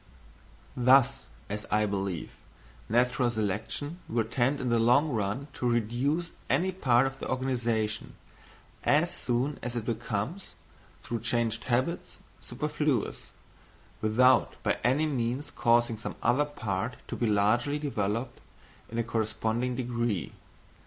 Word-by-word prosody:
Thus, 130 Hz, +2 st, +4 dB, 0.2 s
as 105 Hz, +1 st, -5 dB
I 105 Hz, 0 st, +3 dB
believe, 95 Hz, -5 st, -3 dB, 0.5 s
natural 125 Hz, +2 st, +2 dB
selection 110 Hz, -, -3 dB
will 115 Hz, 0 st, +1 dB
tend 130 Hz, +5 st, 0 dB
in 130 Hz, -, -1 dB
the 120 Hz, -1 st, +3 dB
long 125 Hz, +7 st, +4 dB
run 115 Hz, +3 st, -2 dB
to 125 Hz, -, -1 dB
reduce 125 Hz, +9 st, 0 dB, 0.2 s
any 190 Hz, +2 st, +2 dB
part 130 Hz, -9 st, +3 dB
of 135 Hz, 0 st, -4 dB
the -, -, -5 dB
organisation, 115 Hz, -4 st, -1 dB, 0.7 s
as 155 Hz, +4 st, +3 dB
soon 130 Hz, +4 st, -1 dB
as 120 Hz, 0 st, -4 dB
it 115 Hz, -3 st, -3 dB
becomes, 115 Hz, -, -3 dB, 0.5 s
through 120 Hz, -, -3 dB
changed 115 Hz, 0 st, 0 dB
habits, 130 Hz, +7 st, -1 dB, 0.2 s
superfluous, 150 Hz, -5 st, -2 dB, 0.7 s
without 125 Hz, +4 st, +4 dB
by -, -, +1 dB
any 135 Hz, +7 st, +3 dB
means 130 Hz, -1 st, -2 dB
causing 120 Hz, -2 st, +2 dB
some 110 Hz, -, -6 dB
other 125 Hz, +5 st, +3 dB
part 110 Hz, -5 st, -3 dB
to -, -, -4 dB
be 120 Hz, -, 0 dB
largely 110 Hz, +7 st, +2 dB
developed 115 Hz, -5 st, -2 dB, 0.5 s
in 115 Hz, -, -5 dB
a 115 Hz, -, +2 dB
corresponding 115 Hz, +2 st, -1 dB
degree. 120 Hz, -6 st, -1 dB
120 Hz, 125 wpm, -29 LUFS, 110-135 Hz, 0.7 s, Thus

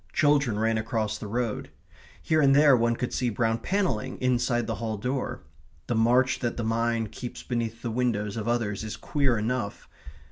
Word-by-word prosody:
Children 140 Hz, -7 st, +3 dB
ran 110 Hz, +1 st, +1 dB
across 110 Hz, -1 st, -2 dB
the 105 Hz, -, -6 dB
road. 115 Hz, +1 st, -2 dB, 0.5 s
Here 155 Hz, -1 st, +2 dB
and 135 Hz, -1 st, +5 dB
there 145 Hz, -2 st, +7 dB
one 115 Hz, 0 st, +2 dB
could 125 Hz, -, -3 dB
see 125 Hz, -, 0 dB
brown 115 Hz, +1 st, 0 dB
panelling 130 Hz, -, -1 dB
inside 120 Hz, -1 st, +1 dB
the 115 Hz, -, -2 dB
hall 110 Hz, -2 st, -2 dB
door.... 125 Hz, +5 st, -3 dB, 0.4 s
The -, -, -1 dB
march 120 Hz, +3 st, +3 dB
that 120 Hz, -2 st, -2 dB
the 120 Hz, -, -2 dB
mind 115 Hz, -1 st, 0 dB
keeps 125 Hz, 0 st, -7 dB
beneath 115 Hz, -1 st, -3 dB
the 120 Hz, -, -2 dB
windows 110 Hz, -4 st, -1 dB
of 110 Hz, -1 st, -4 dB
others 110 Hz, -4 st, -1 dB
is 110 Hz, -, -5 dB
queer 140 Hz, -5 st, +1 dB
enough. 110 Hz, -1 st, -3 dB
120 Hz, 180 wpm, -27 LUFS, 110-125 Hz, 0.5 s, there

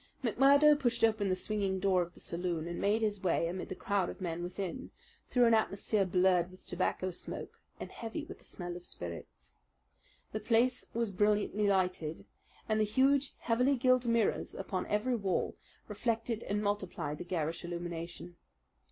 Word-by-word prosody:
McMurdo 280 Hz, +5 st, +6 dB
pushed 240 Hz, -4 st, 0 dB
open 215 Hz, -3 st, +3 dB
the 185 Hz, -, +2 dB
swinging 195 Hz, -1 st, -1 dB
door 185 Hz, -1 st, +3 dB
of 175 Hz, 0 st, -5 dB
the -, -, -12 dB
saloon 170 Hz, -2 st, -3 dB
and 175 Hz, -, -4 dB
made 215 Hz, +3 st, +2 dB
his 205 Hz, -2 st, 0 dB
way 170 Hz, -2 st, +1 dB
amid 180 Hz, +2 st, -4 dB
the -, -, -4 dB
crowd 200 Hz, -2 st, 0 dB
of -, -, -8 dB
men 175 Hz, -2 st, -3 dB
within, 190 Hz, +8 st, -4 dB, 0.4 s
through 245 Hz, -1 st, +4 dB
an 230 Hz, -, +5 dB
atmosphere 205 Hz, -2 st, +1 dB
blurred 180 Hz, -1 st, +3 dB
with 185 Hz, 0 st, -17 dB
tobacco 185 Hz, +1 st, -1 dB
smoke 175 Hz, -, -7 dB, 0.2 s
and -, -, -7 dB
heavy 235 Hz, +7 st, -5 dB
with 385 Hz, -, -10 dB
the -, -, -21 dB
smell 175 Hz, -1 st, -6 dB
of 175 Hz, -, -8 dB
spirits. 85 Hz, -, -8 dB, 0.8 s
The 215 Hz, -, -2 dB
place 240 Hz, +3 st, +2 dB
was 230 Hz, -3 st, 0 dB
brilliantly 210 Hz, +1 st, +2 dB
lighted, 180 Hz, -5 st, 0 dB, 0.4 s
and 215 Hz, 0 st, +1 dB
the -, -, +4 dB
huge, 265 Hz, +6 st, +2 dB
heavily 250 Hz, +4 st, +2 dB
gilt 255 Hz, -1 st, +3 dB
mirrors 230 Hz, -2 st, +1 dB
upon 190 Hz, -1 st, -3 dB
every 225 Hz, +5 st, +1 dB
wall 195 Hz, -5 st, -1 dB, 0.3 s
reflected 225 Hz, +1 st, -1 dB
and 205 Hz, +1 st, 0 dB
multiplied 190 Hz, -7 st, -2 dB
the -, -, -4 dB
garish 165 Hz, -2 st, -2 dB
illumination. 175 Hz, 0 st, -6 dB
200 Hz, 170 wpm, -32 LUFS, 180-230 Hz, 0.8 s, McMurdo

